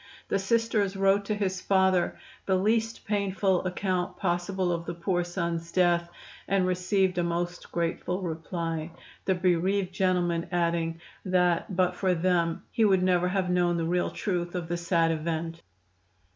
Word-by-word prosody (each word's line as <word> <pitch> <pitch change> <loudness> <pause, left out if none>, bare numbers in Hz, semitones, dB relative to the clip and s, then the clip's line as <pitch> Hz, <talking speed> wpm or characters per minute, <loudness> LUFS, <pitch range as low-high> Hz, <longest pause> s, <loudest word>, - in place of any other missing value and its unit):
The - - +1
Sisters 210 -1 +1
wrote 195 +1 +3
to 215 - -1
his 190 -3 -2
father 190 -2 +2 0.3
the 190 - +3
least 225 +4 0
painful 195 -2 +1
account 185 0 -2
possible 180 0 0
of 170 0 -3
the 170 - -3
poor 175 +1 0
son's 170 -2 -3
death, 175 -1 +2 0.4
and 195 -1 +2
received 185 0 +1
a - - +2
most 175 +1 -3
grateful 175 +2 -2
reply, 165 -1 -3 0.4
the 190 - +2
bereaved 180 +1 +1
gentleman 175 -3 +1
adding 170 -1 0 0.2
that 180 0 +1
but 180 0 +2
for 185 -1 +1
them 170 -1 +1
he 225 - +1
would 190 -3 +4
never 180 -1 +3
have 185 -1 0
known 175 -1 +2
the 165 - -1
real 175 +2 +1
truth 175 -3 -3
of 175 -2 -3
the 175 - 0
sad 170 -1 +2
event. 165 +1 -3
180 Hz, 155 wpm, -28 LUFS, 170-190 Hz, 0.4 s, would